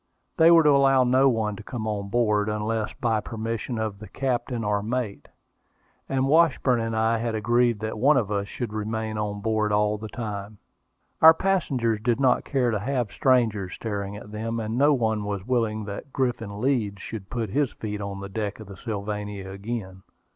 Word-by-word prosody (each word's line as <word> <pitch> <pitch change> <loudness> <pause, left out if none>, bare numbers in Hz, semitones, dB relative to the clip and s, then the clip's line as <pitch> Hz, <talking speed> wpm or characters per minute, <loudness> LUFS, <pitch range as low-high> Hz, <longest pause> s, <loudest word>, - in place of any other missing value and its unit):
They 165 +1 +7
were 165 -1 +7
to 150 - +5
allow 135 -2 +5
no 130 +2 +4
one 110 -4 0
to - - -8
come 110 +1 -5
on 100 -2 -3
board, 105 -2 +2
unless 105 +1 -1
by 115 -3 0
permission 115 +2 -4
of 110 -3 -3
the 105 - -9
captain 125 0 -2
or 105 -1 0
mate; 115 -1 -3 0.8
and 135 0 +1
Washburn 145 -5 +3
and 115 0 -2
I 110 +1 +2
had 115 -1 -2
agreed 120 0 +2
that 110 0 -4
one 145 +6 +5
of 105 -4 0
us 100 -1 -1
should 115 0 -5
remain 110 0 -3
on 105 -1 -3
board 110 0 0
all 105 0 +2
the 110 - -6
time. 105 -2 -6 0.6
Our 160 0 +9
passengers 135 - 0
did 120 +1 +1
not 130 -2 +3
care 130 -4 +1
to 105 - 0
have 125 0 -1
strangers 110 -7 +1
staring 100 -2 -4
at 105 0 -11
them, 115 +2 -3
and 110 0 -3
no 145 +4 +4
one 110 -6 +1
was 100 -2 -4
willing 110 -4 0
that 100 +7 -7
Griffin 120 -6 -2
Leeds 110 -6 0
should 100 -4 -7
put 115 -5 -3
his 140 +2 +1
feet 105 -1 -5
on 100 -1 -5
the 100 - -5
deck 105 +1 -4
of 110 - -9
the 100 -1 -11
Sylvania 105 -2 -5
again. 100 -2 -6
110 Hz, 190 wpm, -25 LUFS, 105-125 Hz, 0.8 s, Our